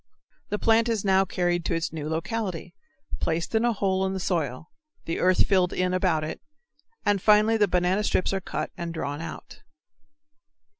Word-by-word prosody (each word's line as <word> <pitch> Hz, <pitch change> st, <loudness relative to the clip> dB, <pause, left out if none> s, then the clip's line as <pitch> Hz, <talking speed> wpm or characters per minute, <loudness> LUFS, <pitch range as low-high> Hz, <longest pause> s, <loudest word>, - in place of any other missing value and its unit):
The 210 Hz, -, -1 dB
plant 225 Hz, +2 st, +3 dB
is 220 Hz, -3 st, -1 dB
now 190 Hz, 0 st, +4 dB
carried 175 Hz, -1 st, 0 dB
to 170 Hz, -, 0 dB
its 165 Hz, -1 st, -2 dB
new 155 Hz, -1 st, -4 dB
locality, 180 Hz, +1 st, -3 dB, 0.5 s
placed 165 Hz, +5 st, -2 dB
in 220 Hz, +1 st, +2 dB
a 240 Hz, -, +3 dB
hole 190 Hz, -3 st, 0 dB
in 190 Hz, 0 st, -1 dB
the 190 Hz, -, -3 dB
soil, 160 Hz, -5 st, -2 dB, 0.3 s
the 165 Hz, -, -2 dB
earth 185 Hz, 0 st, +4 dB
filled 185 Hz, -3 st, +2 dB
in 180 Hz, 0 st, 0 dB
about 180 Hz, -4 st, +1 dB
it, 155 Hz, -, -5 dB, 0.6 s
and 205 Hz, -2 st, +2 dB
finally 215 Hz, +2 st, +5 dB
the 210 Hz, -2 st, +3 dB
banana 180 Hz, +3 st, +1 dB
strips 190 Hz, -2 st, +1 dB
are 195 Hz, -, -1 dB
cut -, -, -4 dB
and 170 Hz, -1 st, -5 dB
drawn 145 Hz, -1 st, -4 dB
out. 165 Hz, -, -9 dB
185 Hz, 180 wpm, -26 LUFS, 165-205 Hz, 0.6 s, finally